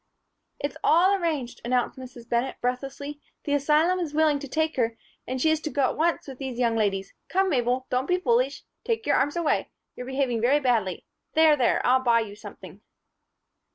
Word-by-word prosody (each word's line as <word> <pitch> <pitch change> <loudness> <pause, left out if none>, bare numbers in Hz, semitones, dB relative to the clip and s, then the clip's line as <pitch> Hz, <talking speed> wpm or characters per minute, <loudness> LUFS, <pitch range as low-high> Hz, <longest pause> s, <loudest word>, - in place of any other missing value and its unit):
"It's 285 -1 -4
all 360 +5 +5
arranged," 320 -10 -2
announced 245 0 0
Mrs. 245 -2 -11
Bennett, 240 +3 0
breathlessly. 275 +4 -4 0.2
"The 285 - -1
asylum 305 +6 +3
is 310 -4 -4
willing 310 -2 +3
to 280 - -7
take 315 +3 -1
her 230 -2 0 0.3
and 255 +1 -3
she 315 +5 +3
is 315 - +1
to 310 - -3
go 285 -2 0
at - - +1
once 330 0 0
with 265 -2 -9
these 265 -3 -5
young 235 -2 +1
ladies. 195 -3 -1 0.2
Come, 385 +1 +2
Mabel, 250 -1 0
don't 255 +2 0
be 360 - +2
foolish. 255 -4 +1 0.2
Take 450 -1 -2
your - - +3
arms 290 - +1
away. 340 -3 0 0.3
You're 250 - -7
behaving 265 -4 -1
very 270 +5 +4
badly 230 -9 0 0.3
There, 315 -1 +6
there, 255 -4 +1
I'll 260 +1 +4
buy 235 -2 +3
you 205 -2 -7
something." 210 - -12
265 Hz, 190 wpm, -26 LUFS, 245-310 Hz, 0.3 s, There